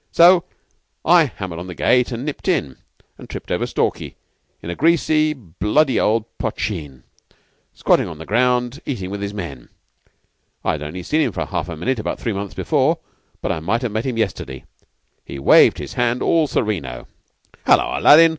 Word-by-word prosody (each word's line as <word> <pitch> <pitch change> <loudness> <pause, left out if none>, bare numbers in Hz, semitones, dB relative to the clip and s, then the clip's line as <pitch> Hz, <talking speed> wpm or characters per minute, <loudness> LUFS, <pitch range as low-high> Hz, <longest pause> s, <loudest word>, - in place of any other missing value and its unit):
So 175 +1 +6 0.6
I 170 -1 +6
hammered 95 - -6
on 90 - -7
the 90 - -7
gate 125 +6 +2
and 120 +3 -4
nipped 150 +4 -5
in, 80 - 0 0.4
and - - -12
tripped - - -7
over - - 0
Stalky - - -2 0.5
in 85 - -4
a - - -5
greasy, 155 -1 +3
bloody 115 - 0
old 110 0 +2
poshteen, 75 - -4 0.7
squatting - - +2
on 80 - -8
the 80 - -9
ground, 125 +4 +1
eating 95 -9 -3
with 100 0 -5
his 100 0 -3
men. 85 -12 -7 1.0
I'd 75 - 0
only 80 +5 -6
seen 155 - +1
him 130 - +1
for - - -3
half - - -3
a 85 - -6
minute 120 +9 -1
about 110 - -3
three 115 - -2
months 100 0 -5
before, - - +1 0.5
but - - 0
I - - -2
might 115 +10 -1
have 120 - -1
met 110 +4 -2
him 125 -3 -2
yesterday. 70 - -3 0.6
He 70 - -8
waved 70 - +6
his - - -7
hand 120 0 0
all 160 -2 +3
sereno. 75 - -2 0.6
"'Hullo, - - +3
Aladdin! 165 +3 +8
110 Hz, 175 wpm, -20 LUFS, 85-135 Hz, 1.0 s, Aladdin